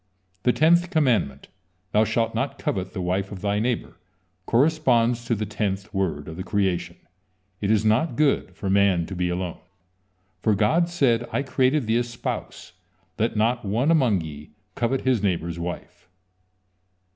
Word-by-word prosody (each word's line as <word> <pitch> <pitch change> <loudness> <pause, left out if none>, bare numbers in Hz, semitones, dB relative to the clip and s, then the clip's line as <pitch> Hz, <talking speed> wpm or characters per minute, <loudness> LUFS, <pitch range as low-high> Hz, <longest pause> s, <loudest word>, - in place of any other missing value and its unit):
The 125 - +3
tenth 165 +7 +3
commandment: 125 - +1 0.4
"Thou 110 +1 +4
shalt 115 0 0
not - - -2
covet 95 0 -3
the 95 - -4
wife 95 +3 -1
of 95 -3 -7
thy 100 0 0
neighbor," 115 -5 -2 0.5
corresponds 120 -4 +2
to 115 - +1
the 105 0 -2
tenth 100 -1 -3
word 85 -7 -2
of 80 0 -8
the 95 - -4
creation: 95 -3 -1 0.7
"It 100 - -1
is 110 0 +2
not 115 +9 +2
good 150 -2 +1
for 100 - -5
man 95 -3 +3
to 95 - -7
be 90 0 0
alone," 90 0 -3 0.8
for 110 0 +2
God 160 - +2
said: 120 -9 +1
"I 140 - 0
created 130 +1 +1
thee 110 +1 +2
a 120 - +2
spouse, 120 -5 -6 0.5
and 110 - +3
let - - -8
not 115 +3 +1
one 115 +10 +1
among 125 - +3
ye 75 -2 -9 0.2
covet 125 +2 0
his 130 -5 +1
neighbor's 85 -4 -1
wife." 85 +1 -7
110 Hz, 165 wpm, -24 LUFS, 95-125 Hz, 0.8 s, Thou